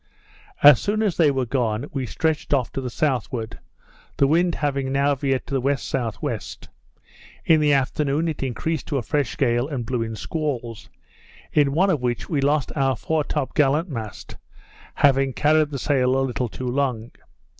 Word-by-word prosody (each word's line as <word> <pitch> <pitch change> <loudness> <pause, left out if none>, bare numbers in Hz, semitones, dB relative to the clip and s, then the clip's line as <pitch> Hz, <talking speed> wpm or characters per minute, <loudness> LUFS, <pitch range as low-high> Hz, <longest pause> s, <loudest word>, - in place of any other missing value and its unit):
As 145 -4 +9
soon 215 +2 0
as 200 -5 0
they 160 -4 +4
were 135 -2 0
gone, 120 -1 -1
we 135 -3 -3
stretched 155 +2 0
off 125 -4 -1
to 135 - -4
the 125 - -4
southward, 120 -4 -2 0.6
the 140 - +4
wind 170 +4 +2
having 140 -2 -1
now 140 +1 +2
veered 135 -1 -1
to - - -8
the 135 - +2
W.S.W. 130 -3 -2 1.1
In 160 -1 +5
the 150 -1 +3
afternoon 140 +3 0
it 160 - -3
increased 135 +4 -3
to 145 - -1
a 125 - -2
fresh 145 -2 -1
gale, 120 -1 +1
and 135 -6 -4
blew 125 0 -2
in 115 -1 -3
squalls; 125 -5 -4 0.6
in 145 -2 +3
one 190 +5 +3
of 150 -7 0
which 120 -1 -2
we 150 -4 -1
lost 145 0 +1
our 135 -2 +1
fore 155 +6 -1
top 135 - -3
gallant 150 +4 +2
mast, 110 -7 -7 0.6
having 135 -1 +3
carried 155 +1 +3
the 140 - -4
sail 130 -2 +1
a 135 - +1
little 125 -1 -2
too 130 - -7
long. 125 -3 -1
135 Hz, 175 wpm, -23 LUFS, 125-150 Hz, 1.1 s, As